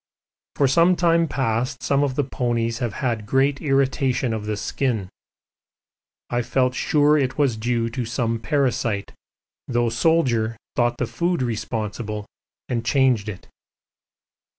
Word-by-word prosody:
For 140 - +3
some 170 +7 +4
time 170 -1 +3
past 125 0 -1
some 140 0 +2
of 135 -3 -1
the 145 - +1
ponies 120 -3 -1
have 120 -5 -2
had 110 -4 -1
great 135 +3 +2
irritation 135 -3 +1
of 105 -1 -4
the 105 -1 -2
skin. 110 -4 -2 1.2
I 120 0 +1
felt 125 +1 +1
sure 150 +2 +3
it 130 -2 -1
was 140 -6 +2
due 115 +1 0
to 125 0 -3
some 115 -1 -1
parasite, 115 -4 0 0.6
though 120 -1 +1
the - - -4
Soldier 120 -7 +2 0.2
thought 120 0 +1
the 125 - 0
food 170 +3 -1
responsible 110 -2 -3 0.4
and 120 -2 -2
changed 125 -5 +2
it. 95 - -8
125 Hz, 140 wpm, -23 LUFS, 115-140 Hz, 1.2 s, some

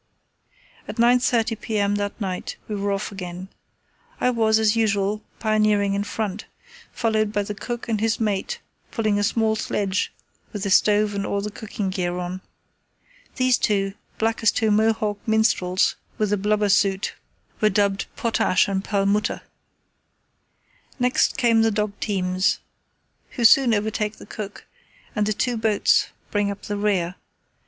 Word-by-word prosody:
At - - -6
9.30 235 -2 +2
p.m. 205 -2 0
that 205 +2 -3
night 185 -3 -4
we 215 - -4
were 200 0 -1
off 195 +1 -2
again. 185 -1 -7 0.7
I 250 - +2
was, 220 -2 +3
as 220 0 +3
usual, 210 -2 +1 0.2
pioneering 215 -2 +2
in 200 0 0
front, 205 -1 -4 0.5
followed 215 -2 0
by 205 -1 0
the 210 - -5
cook 240 +4 -5
and 220 -3 -1
his 225 0 +1
mate 215 - -1 0.3
pulling 215 -2 0
a - - +1
small 220 +1 +1
sledge 200 -2 -1 0.4
with 205 -3 -5
the 200 - -1
stove 210 +1 +4
and 200 0 -2
all 200 - -1
the 210 +1 -4
cooking 205 -2 -4
gear 180 -1 -2
on. 180 +1 -4 0.9
These 255 -1 +3
two, 195 -2 +1 0.2
black 225 +1 0
as 225 - +5
two 220 -1 +1
Mohawk 215 -1 +1
Minstrels 215 -4 +2 0.2
with 215 -3 0
the 205 - +2
blubber 210 +1 +1
soot, 195 0 +2 0.5
were 215 - +5
dubbed 200 -1 +1
"Potash 220 -5 +2
and 195 -1 -1
Perlmutter." 200 0 0 1.6
Next 250 -1 +2
come 235 -3 +4
the 225 - +4
dog 210 -1 -1
teams, 185 -2 0 0.8
who 240 - 0
soon 255 +1 +7
overtake 210 0 -1
the - - -13
cook, 205 -1 -8 0.5
and 210 -1 +1
the 215 - +1
two 245 +3 -1
boats 220 -2 +3 0.2
bring 205 -1 +1
up 200 - -6
the 205 - -3
rear. 190 -4 0
210 Hz, 150 wpm, -23 LUFS, 200-220 Hz, 1.6 s, soon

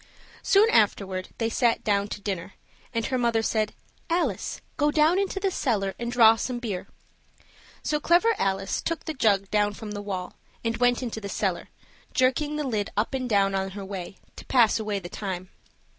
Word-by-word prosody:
Soon 405 +3 +5
afterward 195 - +1
they 225 - 0
sat 235 0 +1
down 200 -2 +1
to 210 - -6
dinner, 195 -2 -4 0.4
and 230 -2 -1
her 255 -1 -1
mother 230 -2 +2
said, 215 -1 0 0.3
"Alice, 345 +1 -1 0.2
go 295 0 +2
down 310 +5 +4
into 395 0 -1
the 390 0 0
cellar 205 - 0
and 235 0 -3
draw 225 -2 +7
some 245 +2 -3
beer." 215 -7 -4 1.0
So 300 - 0
Clever 350 +9 +4
Alice 195 0 0
took 330 0 -3
the 315 - -3
jug 200 -7 +2
down 205 -1 +2
from 215 -1 -7
the 205 0 -4
wall, 190 -3 -4 0.3
and 230 0 +1
went 245 +1 +2
into 225 -2 -4
the 200 - -5
cellar, - - -2 0.5
jerking 290 +2 +2
the 300 - -1
lid 215 -5 -1
up 215 +6 0
and 255 -2 -2
down 195 -2 +3
on 195 0 -1
her 200 - -5
way, 190 -1 -6 0.2
to - - -10
pass 235 -4 +4
away 210 -2 -2
the 180 -3 -6
time. 185 -1 -5
225 Hz, 190 wpm, -26 LUFS, 200-260 Hz, 1.0 s, draw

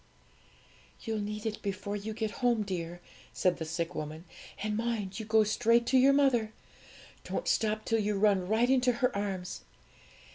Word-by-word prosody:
'You'll 220 -2 -2
need 210 +1 -4
it 220 -1 -3
before 200 +1 -3
you 215 +1 -5
get 220 -2 -2
home, 240 -3 +3
dear,' 175 -3 -5 0.3
said 180 -1 +1
the 160 - -4
sick 165 +2 -3
woman; 155 +1 -5 0.4
'and 215 0 -1
mind 220 -3 -2
you 220 - -6
go 220 0 +5
straight 230 +2 +3
to 260 - +3
your 270 +2 +6
mother. 255 -6 +2 0.7
Don't - - -4
stop 215 0 +1
till 225 - +1
you 210 -1 0
run 195 -3 +3
right 220 +4 +3
into 250 -1 +3
her 250 -1 0
arms! 195 -3 -3
215 Hz, 170 wpm, -30 LUFS, 195-230 Hz, 0.7 s, your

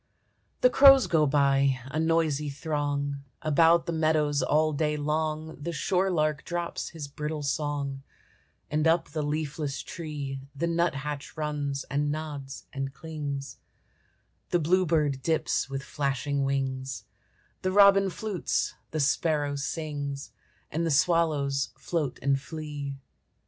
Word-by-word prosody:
The 250 - +6
crows 275 -1 +8
go 155 -3 +3
by, 135 -1 +3
a 140 +4 -3
noisy 160 -3 +1
throng; 145 -1 -2 0.2
About 165 +2 +4
the - - -2
meadows 155 -2 +2
all 155 +1 +2
day 150 +1 0
long 155 +1 -1
The 170 +3 -3
shore 185 +4 +1
lark 155 -4 +1
drops 175 -1 -3
his 155 -4 -7
brittle 150 +1 -4
song; 140 -1 -2 0.7
And 155 +1 +2
up 165 +1 +2
the 155 +1 -3
leafless 150 -1 -2
tree 145 -5 -5
The 155 +5 -1
nut 170 -1 +1
hatch 145 +1 -5
runs, 145 -2 -2
and 145 +2 -1
nods, 145 -3 -6
and 135 -1 -3
clings; 145 -3 -5 0.9
The 175 - +3
bluebird 160 -5 +2
dips 160 -1 0
with 135 0 -4
flashing 140 0 -1
wings, 135 -1 -2 0.6
The 185 - 0
robin 195 0 +6
flutes, 200 -1 -2 0.2
the 155 - -3
sparrow 145 0 +1
sings, 145 -1 -4 0.4
And 165 +2 -1
the 165 - +1
swallows 150 -3 +2
float 155 -7 -2
and 135 0 +2
flee. 145 -2 -6
150 Hz, 130 wpm, -28 LUFS, 140-160 Hz, 0.9 s, crows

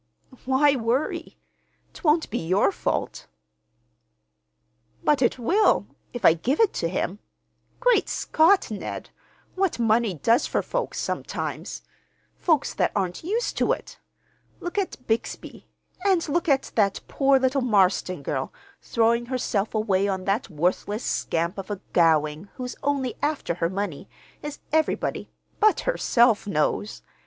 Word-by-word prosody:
"Why 275 +2 +4
worry? 245 +4 -2 0.6
'Twon't 315 - +1
be 235 - -1
your 185 +4 +2
fault." - - -3 1.8
"But 295 -2 +3
it 245 - +2
will—if 255 - 0
I 160 - +8
give 245 - -1
it 445 -3 +4
to 165 - 0
him. 185 +2 -2 0.6
Great - - +3
Scott, 330 - +3
Ned! 210 - -6 0.4
what 380 -2 0
money 225 -3 +2
does 230 - +2
for - - -1
folks, - - -3
sometimes—folks 310 -5 -3
that - - +1
aren't 185 - -2
used 440 +8 -1
to - - +3
it! - - -8 0.6
Look 350 +3 -3
at 365 -9 -4
Bixby; 225 +1 -3 0.4
and 380 -5 +2
look 335 +3 0
at 275 -1 +2
that 200 -3 +1
poor 275 -1 +3
little 260 +1 +1
Marston 185 - +2
girl, 135 -1 -2 0.3
throwing 235 +1 +1
herself 230 -5 -1
away 200 -2 +1
on 190 -2 -2
that 200 +4 0
worthless 185 +7 -1
scamp 170 +4 -1
of 195 - -7
a 205 -2 -3
Gowing 160 +1 +2
who's 250 -1 -5
only 275 -3 -1
after 295 - -1
her 165 0 -1
money, 195 -2 -4 0.3
as 295 -1 -6 0.2
everybody 315 0 0 0.3
(but 430 0 +4
herself) 235 - +2
knows! 200 +3 -1
235 Hz, 130 wpm, -25 LUFS, 195-295 Hz, 1.8 s, I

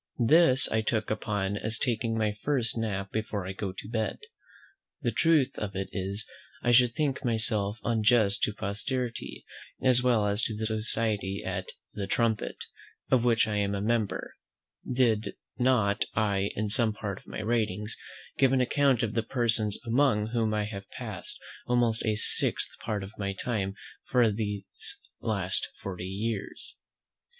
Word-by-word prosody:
This 135 +1 +5
I 110 0 +2
look 110 -3 -1
upon 105 -2 -1
as 110 +2 -2
taking 115 -2 0
my 110 -1 +2
first 130 -6 +1
nap 100 -4 -2
before 110 -3 -2
I 95 - -3
go 95 0 -3
to 95 - -8
bed. 110 -1 -1 0.9
The - - +2
truth 155 -5 +3
of 100 -3 -4
it 95 0 -3
is, 100 +2 -3 0.4
I 120 - +3
should 120 -1 +5
think 145 -3 0
myself 110 -3 +1
unjust 110 -3 +3
to 105 - +1
posterity, 120 +5 -3 0.3
as 125 -1 +4
well 120 -4 +3
as 105 +1 +1
to 110 - -2
the 110 +1 -2
society 110 -2 +1
at 95 0 -3 0.3
"The 100 -2 -4
Trumpet," 115 +1 0 0.5
of 130 -3 +4
which 115 -2 +4
I 105 -1 -1
am 100 0 +1
a - - -1
member, 110 -1 0 0.6
did 115 -4 +2 0.2
not 110 -5 +3
I 100 -2 +1
in 105 0 -1
some 110 0 +5
part 100 -2 -4
of - - -24
my 105 - -5
writings 105 -2 0 0.4
give 135 -1 +5
an 130 - +4
account 130 -1 +3
of 110 - -1
the 115 - +1
persons 115 -3 +1
among 115 -3 +2
whom 115 -2 +1
I 105 -1 +1
have 100 -2 -6
passed - - -6 0.3
almost 120 -2 +2
a 110 -1 +2
sixth 105 - 0
part 105 -3 -2
of 95 - -8
my 100 -1 -1
time 100 -2 -2 0.3
for 120 -4 +4
these 105 -2 -2 0.6
last 95 -4 -1
forty 90 -2 -5
years. 105 +2 -4
110 Hz, 160 wpm, -29 LUFS, 100-120 Hz, 0.9 s, This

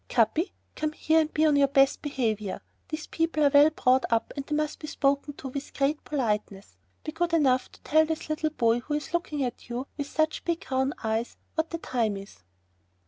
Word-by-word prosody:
"Capi, 245 - +2 0.2
come 310 0 -2
here, 320 +1 +3
and 315 -1 0
be 310 - +2
on 300 -2 +4
your 280 -1 +5
best 275 0 +3
behavior. 220 -9 -2 0.3
These 310 0 -4
people 330 -2 0
are 285 - +5
well 290 +2 +8
brought 260 -4 +2
up, 230 0 +1
and 280 - -3
they 300 - -3
must 305 0 -1
be 305 - -7
spoken 280 0 0
to 270 - -7
with 280 +2 -7
great 280 +2 +1
politeness. 210 - -2 0.3
Be 310 - -4
good 340 +2 -1
enough 265 -6 +3
to - - -17
tell 315 +1 +4
this 320 0 -3
little 310 0 0
boy 235 -5 +2
who 295 +5 -3
is 300 +3 -5
looking 305 -5 -1
at 245 -1 -5
you 245 +2 -3
with 285 - -2
such 315 +1 0
big, 340 +2 -2
round 265 +2 +1
eyes 220 +1 -1 0.2
what 320 0 -1
time 225 -5 0
it - - -6
is." 150 - -18
285 Hz, 210 wpm, -27 LUFS, 250-310 Hz, 0.3 s, well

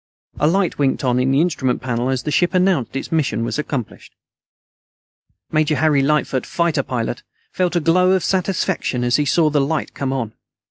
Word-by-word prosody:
A 150 - +3
light 180 0 +1
winked 140 -1 +1
on 125 -1 +1
on 130 +1 +1
the 135 +2 +3
instrument 150 -7 0
panel 125 0 -2
as 130 -1 -1
the 150 - -3
ship 175 +4 +1
announced 180 - +1
its 135 - -4
mission 140 -8 0
was 150 - -3
accomplished. 140 -6 -5 1.4
Major 155 -1 +2
Harry 150 -3 +3
Lightfoot, 140 -2 +1
fighter 170 -4 0
pilot, 120 -2 -3 0.3
felt 180 -1 -1
a - - +3
glow 180 +3 +3
of 190 -3 +1
satisfaction 185 -8 -1
as 120 +1 +2
he 150 - +1
saw 155 +1 +2
the 145 -1 +2
light 150 +3 -2
come 135 -1 -3
on. 120 -5 -3
150 Hz, 185 wpm, -20 LUFS, 130-170 Hz, 1.4 s, A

